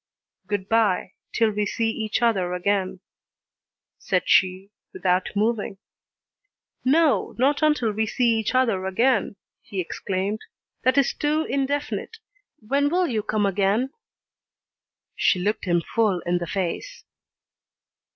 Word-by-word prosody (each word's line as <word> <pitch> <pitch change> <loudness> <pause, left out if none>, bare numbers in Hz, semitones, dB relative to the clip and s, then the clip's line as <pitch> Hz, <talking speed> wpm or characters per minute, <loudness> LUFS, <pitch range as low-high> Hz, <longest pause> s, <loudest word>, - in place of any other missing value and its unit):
"Good 205 -2 -2
bye, 215 -5 +2 0.2
till 225 -2 +2
we 210 0 -1
see 225 +3 0
each 220 +1 -2
other 190 -6 +2
again," 190 0 -1 1.0
said - - 0
she, 190 +1 +2 0.2
without 180 0 +1
moving. 210 -1 0 1.1
"No, 300 +3 +2
not 275 +5 +2
till 230 -6 -1
we 220 +1 -1
see 235 -1 +2
each 220 +3 -2
other 225 -8 +2
again!" 215 +1 +1 0.3
he 195 - -6
exclaimed, 190 +3 -2 0.4
"that 255 +2 +3
is 275 - +3
too 300 +1 0
indefinite. 285 +9 -2 0.5
When 280 +3 +2
will 360 +3 +2
you 230 -9 -1
come 215 0 0
again?" 200 +6 +1 1.2
She - - +3
looked 205 +4 -1
him 175 -2 +1
full 215 -6 +2
in 175 0 0
the 175 - -4
face. 195 - -4
215 Hz, 125 wpm, -24 LUFS, 190-255 Hz, 1.2 s, that